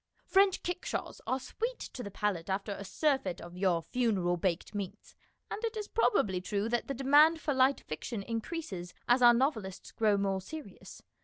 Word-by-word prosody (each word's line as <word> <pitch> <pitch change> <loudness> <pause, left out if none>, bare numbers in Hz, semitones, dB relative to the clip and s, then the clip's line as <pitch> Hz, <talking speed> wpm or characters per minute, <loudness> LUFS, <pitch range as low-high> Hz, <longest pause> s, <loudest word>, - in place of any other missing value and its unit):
French 390 -1 +3
kickshaws 355 0 -4
are 260 - +1
sweet 465 - -4
to 255 - -7
the 205 - -5
palate 200 -3 -2
after 195 +2 -1
a 200 - -5
surfeit 200 - 0
of 175 +1 -10
your 180 -3 +1
funeral 205 -8 +1
baked 175 +2 -1
meats, 200 0 -6 0.4
and 435 - -4
it 455 -1 -2
is 420 -1 -4
probably 200 - +2
true 205 +2 -1
that 240 +1 -1
the 275 - -3
demand 295 +5 +5
for 295 -2 -1
light 265 +1 +3
fiction 200 +7 -5
increases 225 - -5
as 245 +1 +4
our 240 -1 +8
novelists 225 -8 -1
grow 210 -2 +2
more 195 -1 0
serious. 310 +11 -10
225 Hz, 175 wpm, -31 LUFS, 190-285 Hz, 0.4 s, our